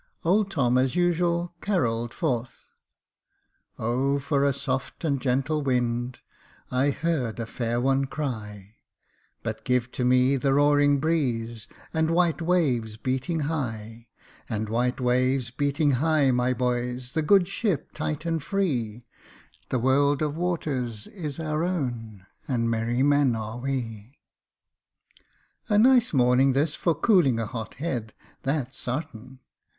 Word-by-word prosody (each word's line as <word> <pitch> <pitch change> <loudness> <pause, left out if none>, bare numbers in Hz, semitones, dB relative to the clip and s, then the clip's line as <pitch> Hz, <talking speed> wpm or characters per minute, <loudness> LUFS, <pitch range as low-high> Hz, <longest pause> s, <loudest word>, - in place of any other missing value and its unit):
Old 200 +4 +3
Tom 125 -8 +2
as 130 -1 +1
usual 175 0 +1
carolled 120 - 0
forth 125 -6 -3 0.2
— - - -58
" - - -46
Oh! 130 +5 0
for 140 0 0
a 140 - +3
soft 135 +1 -3
and 140 -4 0
gentle 135 +4 0
wind, 125 -2 -1 0.5
I 130 +3 +2
heard 140 -7 -1
a 115 - -2
fair 120 +1 -2
one 135 +2 +2
cry, 110 -8 -6 0.7
But 110 0 -4
give 125 -1 0
to 125 - -3
me 125 +2 +4
the 135 +1 +1
roaring 145 0 +4
breeze, 120 -8 -1 0.3
And 160 0 +1
white 170 0 +2
waves 135 -11 +1
beating 130 +7 -2
high, 115 -7 -4 0.4
And 110 -2 -2
white 125 +4 0
waves 125 0 +1
beating 145 +3 +1
high, 145 +1 +3
my 125 0 +1
boys, 125 0 -2
The 160 - 0
good 180 +3 +4
ship 195 - -1
tight 155 +1 -4
and 165 -1 -1
free, 125 - -2 0.6
The - - +1
world 140 +4 +2
of 150 -1 -1
waters 140 -11 -2
is 160 -7 -6
our 155 0 -1
own, 120 - -3 0.2
And 115 -3 0
merry 115 +3 0
men 145 -3 +3
are 110 +2 -5
we." 120 -2 -4 1.5
A 205 - +3
nice 245 +1 +5
morning 130 0 +4
this 145 +3 +1
for 170 0 0
cooling 155 - +3
a 115 - -1
hot 110 0 -6
head, 125 -7 -4 0.3
that's 135 -2 -2
sartain. 130 -1 -5
130 Hz, 140 wpm, -26 LUFS, 120-155 Hz, 1.5 s, nice